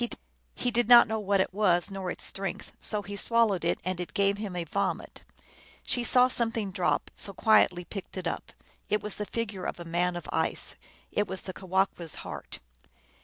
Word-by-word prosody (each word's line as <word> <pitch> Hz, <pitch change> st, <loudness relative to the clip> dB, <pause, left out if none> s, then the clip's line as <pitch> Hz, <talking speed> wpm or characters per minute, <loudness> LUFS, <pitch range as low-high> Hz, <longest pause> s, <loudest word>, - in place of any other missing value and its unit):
He 245 Hz, -, -1 dB
did 240 Hz, -1 st, +1 dB
not 240 Hz, 0 st, +10 dB
know 220 Hz, 0 st, -1 dB
what 200 Hz, -1 st, +1 dB
it 190 Hz, -, -2 dB
was, 185 Hz, -2 st, +2 dB
nor 190 Hz, -2 st, -4 dB
its -, -, -4 dB
strength, 195 Hz, -2 st, -4 dB
so 210 Hz, -1 st, -2 dB
he 200 Hz, 0 st, -6 dB
swallowed 215 Hz, -3 st, +2 dB
it, 170 Hz, -, +1 dB
and 185 Hz, -1 st, -2 dB
it 180 Hz, -, -6 dB
gave 200 Hz, 0 st, +2 dB
him 205 Hz, -4 st, -4 dB
a 175 Hz, -, -1 dB
vomit. 200 Hz, +4 st, -2 dB, 0.6 s
She 245 Hz, -, 0 dB
saw 250 Hz, +1 st, +5 dB
some 235 Hz, -2 st, +2 dB
thing 215 Hz, -4 st, -3 dB
drop, 175 Hz, -6 st, 0 dB
so 200 Hz, -, -1 dB
quietly 190 Hz, -5 st, +4 dB
picked 195 Hz, +2 st, -7 dB
it 185 Hz, -, -4 dB
up: 165 Hz, -, -3 dB, 0.4 s
it 210 Hz, +1 st, +1 dB
was 210 Hz, -1 st, -2 dB
the 210 Hz, -, -3 dB
figure 205 Hz, -5 st, -3 dB
of -, -, -4 dB
a 175 Hz, -, -7 dB
man 175 Hz, +1 st, 0 dB
of 175 Hz, -, -6 dB
ice; -, -, -1 dB, 0.4 s
it 205 Hz, -1 st, +1 dB
was 190 Hz, -1 st, -5 dB
the 185 Hz, -, -6 dB
Kewahqu 190 Hz, -1 st, 0 dB
s 165 Hz, -, -5 dB
heart. 75 Hz, -6 st, -7 dB
195 Hz, 205 wpm, -29 LUFS, 180-215 Hz, 0.6 s, not